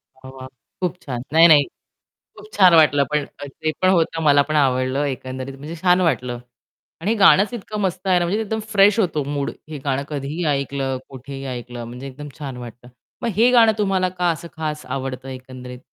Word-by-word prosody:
वाह! 130 0 -12
वाह! 130 0 -9 0.3
खूप 180 -1 -1
छान. 125 -3 -5
नाही, 165 +1 +8
नाही. 150 -3 +7 0.7
खूप - - -12
छान 185 -3 +6
वाटलं 145 -3 +5
पण 150 -1 0
अ, 145 +1 -11
ते 155 +3 -3
पण 185 - +4
होतं. 165 -2 +1
मला 145 -1 +5
पण 155 - 0
आवडलं 130 0 +1
एकंदरीत 130 0 -6
म्हणजे 150 +4 -8
छान 180 0 +4
वाटलं. 125 -8 0 0.6
आणि 200 - 0
हे 230 - 0
गाणंच 200 +3 +5
इतकं 215 -1 -5
मस्त 185 0 -2
आहे 180 -1 +4
ना, 175 - 0
म्हणजे 205 +6 -1
एकदम 220 +1 -3
फ्रेश 205 +2 +5
होतो 160 -7 0
मूड. 140 0 -3 0.2
हे 155 - -6
गाणं 140 0 0
कधीही 150 +4 -4
ऐकलं, 135 -1 -2
कुठेही 135 +1 -8
ऐकलं 120 0 -7
म्हणजे 125 +3 -8
एकदम 145 +3 -9
छान 135 -4 -6
वाटतं. 120 0 -10 0.4
मग 235 - 0
हे 235 +3 +5
गाणं 230 -3 +6
तुम्हाला 190 -3 +1
का 180 -1 -1
असं 170 +1 -6
खास 155 -1 -4
आवडतं 135 0 -5
एकंदरीत? 125 -1 -9
145 Hz, 195 wpm, -21 LUFS, 130-180 Hz, 0.7 s, नाही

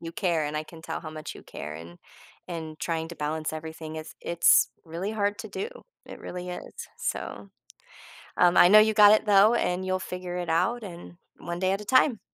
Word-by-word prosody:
you 165 0 -7
care, 170 -5 0
and 150 +1 -3
I 155 - -1
can 160 +1 -13
tell - - -5
how 155 - -8
much 155 0 -7
you - - -12
care, 75 - -8
and 85 +2 -11 0.5
and 160 -3 -6
trying 160 +3 -2
to 170 - -9
balance 155 +1 -3
everything 160 0 -7
is 155 0 -8
it's 170 0 +4 0.2
really 170 +5 -4
hard 205 -1 -1
to 220 - -8
do, 395 - -4 0.4
it - - -10
really 180 0 -7
is, 180 - -8 0.2
so, 100 -1 -5 0.9
um, 175 0 +5
I - - +8
know 210 +2 +9
you 220 +1 +4
got 210 -1 +8
it 215 - +2
though, 205 +2 +6
and 180 -5 0
you'll 185 0 0
figure 180 -1 -6
it 175 -1 -4
out, 230 +9 +1
and 175 -3 -10 0.2
one 175 0 -6
day 185 0 +1
at 195 +2 -1
a - - -9
time. 255 0 +3
175 Hz, 215 wpm, -27 LUFS, 160-200 Hz, 0.9 s, know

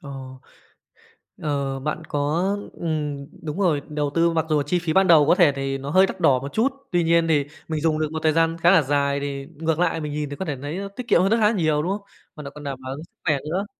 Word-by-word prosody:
Ờ. 140 - -10 1.3
Ờ, 140 -2 -2
bạn 150 +3 -3
có 145 +3 0 0.3
ừm, 150 -4 -3 0.2
đúng 155 +3 -4
rồi, 165 -7 +2
đầu 150 -1 -1
tư 170 0 +4
mặc 165 -1 0
dù 150 -2 +2
chi 175 +5 0
phí 165 -2 -2
ban 190 +1 +4
đầu 155 -4 +7
có 170 - +5
thể 175 -6 +5
thì 135 0 -2
nó 135 +1 -6
hơi 185 +5 +5
đắt 190 - -7
đỏ 130 -2 +4
một 140 +2 -7
chút, 250 +5 +2 0.2
tuy 175 -2 +2
nhiên 165 0 +3
thì 150 -3 +2 0.2
mình 155 -2 -2
dùng 155 -1 +1
được 155 -1 -1
một 160 - -3
thời 155 -1 +3
gian 165 +1 +2
khá 170 +1 +4
là 185 -4 +6
dài 140 0 0
thì 140 -1 -4
ngược 160 +1 -1
lại 175 -2 +1
mình 150 -1 -4
nhìn 150 -1 -3
thì 145 - -5
có 190 - -5
thể 150 -5 -2
nấy 145 +5 -5
nó 200 +1 -4
tiết 235 +5 -8
kiệm 170 - +4
hơn 195 +2 +2
rất 225 - +4
há 215 -1 +4
nhiều, 155 -8 +1
đúng 180 - -1
hông? 205 +1 -3 0.3
Và 150 - -8
nại 140 - -7
còn 150 - -9
đảm 140 -2 -4
bảo 130 +1 -5
sức - - -17
khỏe 155 -4 +3
nữa. 190 +5 -1
155 Hz, 270 wpm, -23 LUFS, 145-170 Hz, 1.3 s, đầu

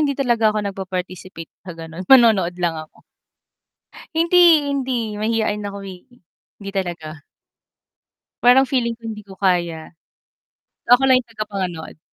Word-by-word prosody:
hindi 285 -2 +1
talaga 240 -5 +2
ako 215 - -2
nagpaparticipate 185 -3 -6
sa 180 - -8
ganu'n 165 +2 -8
manonood 220 -9 +5
lang 175 -2 -1
ako. - - -26 1.1
Hindi, 330 -2 +4
hindi, 265 -3 -2 0.2
mahiyain 215 -1 -1
ako 200 0 -6
eh, 185 -2 -10 0.6
hindi 200 -1 -7
talaga. 165 -5 -5 1.2
Parang 255 +2 +6
feeling 240 -3 -1
ko 235 - -36
hindi 215 -2 -7
ko 195 -1 -14
kaya. 170 -4 -1 1.0
Ako 245 +2 +6
lang 255 -1 +4
yung 235 - -28
taga-panood. 190 -8 -6
210 Hz, 130 wpm, -20 LUFS, 180-245 Hz, 1.2 s, Parang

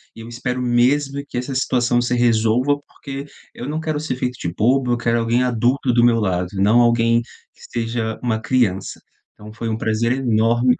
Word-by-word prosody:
e - - -10
eu 115 - -10
espero 125 +1 -4
mesmo 135 +3 +1
que - - -5
essa 125 +2 -3
situação 125 -2 +1
se 120 0 0
resolva, 120 +3 +2
porque 140 -1 -8 0.3
eu 125 - -7
não 155 +1 -2
quero 155 -2 -2
ser 150 -4 -3
feito 125 -1 -3
de 85 - -3
bobo. 125 +7 +1
Eu - - 0
quero 115 0 0
alguém 115 +2 +1
adulto 125 +2 +1
do 120 0 +3
meu 120 -1 +4
lado, 90 -4 0
e 95 - -2
não 110 +4 +5
alguém 115 0 +3
que 120 - -19 0.2
seja 115 -1 -2
uma 110 -3 -1
criança. 110 -7 0 0.3
Então 105 +1 -12
foi 115 0 -4
um 110 - -2
prazer 115 +2 0
enorme. 120 0 +2
120 Hz, 200 wpm, -20 LUFS, 115-125 Hz, 0.3 s, não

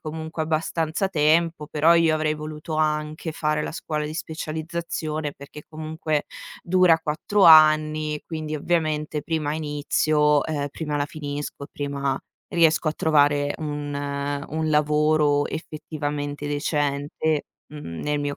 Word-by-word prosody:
comunque 160 +1 -5
abbastanza 160 +3 -1
tempo, 160 -1 +2
però 160 +2 +4
io 165 -1 +4
avrei 155 0 0
voluto 155 +1 -6
anche 155 +1 -1
fare 150 -1 0
la - - -5
scuola 155 -2 -3
di 155 - -5
specializzazione 160 -1 -4
perché 140 +2 -12
comunque 155 -1 -3 0.4
dura 175 -2 +4
4 165 +7 0
anni, 155 -1 +6
quindi 155 -2 -5
ovviamente 155 -1 -1
prima 155 -2 -1
inizio, 150 -1 +1
ehm, 145 -2 -2
prima 150 0 -3
la 145 0 0
finisco, 145 -1 -6
prima 140 -2 -2 0.4
riesco 165 -1 +3
a 155 - +2
trovare 145 -2 +2
un 145 -2 -4 0.6
un 155 0 -2
lavoro 150 -1 +3
effettivamente 145 -2 -4
decente, 145 +1 -1 0.3
mhmm, 85 - -7
nel 150 0 -1
mio 145 0 -2
155 Hz, 125 wpm, -24 LUFS, 150-160 Hz, 0.6 s, anni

